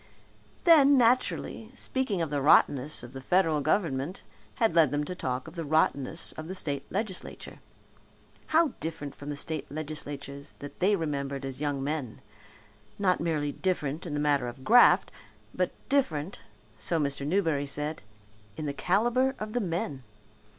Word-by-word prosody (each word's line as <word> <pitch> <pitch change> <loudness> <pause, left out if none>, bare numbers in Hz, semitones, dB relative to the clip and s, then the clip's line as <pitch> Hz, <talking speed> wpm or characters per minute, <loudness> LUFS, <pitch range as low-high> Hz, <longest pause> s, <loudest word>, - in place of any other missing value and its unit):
Then, 285 -5 +7
naturally, 235 -2 +1
speaking 245 -10 0
of 155 - -4
the 145 -1 0
rottenness 140 -1 +4
of 120 +1 -10
the 135 - -7
federal 165 -1 +2
government 155 0 -1 0.3
had 225 -6 +2
led 165 -4 +5
them 145 +2 -1
to 165 - -5
talk 130 -7 -3
of 160 - -10
the 170 -2 -4
rottenness 155 0 0
of 155 0 -8
the 185 - -5
state 145 -6 -1
legislature. 200 -2 -4 0.9
How 320 0 +4
different 155 -3 -5
from 145 - -9
the 145 - -3
state 155 0 -4
legislatures 145 -2 -6
that 145 - -10
they 200 +3 +3
remembered 140 -5 -3
as 135 +1 -6
young 145 -2 -1
men! 140 -5 -3 0.8
Not 185 -3 +2
merely 155 -3 0
different 165 -2 -2
in 150 - -3
the - - -1
matter 145 -4 +2
of 125 +2 -8
graft, 245 - +6 0.4
but - - 0 0.2
different, 185 - 0 0.4
so 120 +10 0
Mr. 140 -1 -1
Newberry 155 -3 +1
said, 150 +3 -2 0.6
in 155 - -4
the 140 - -2
calibre 240 - +1
of 215 0 -6
the 245 - 0
men. 165 -7 -3
155 Hz, 155 wpm, -28 LUFS, 140-185 Hz, 0.9 s, Then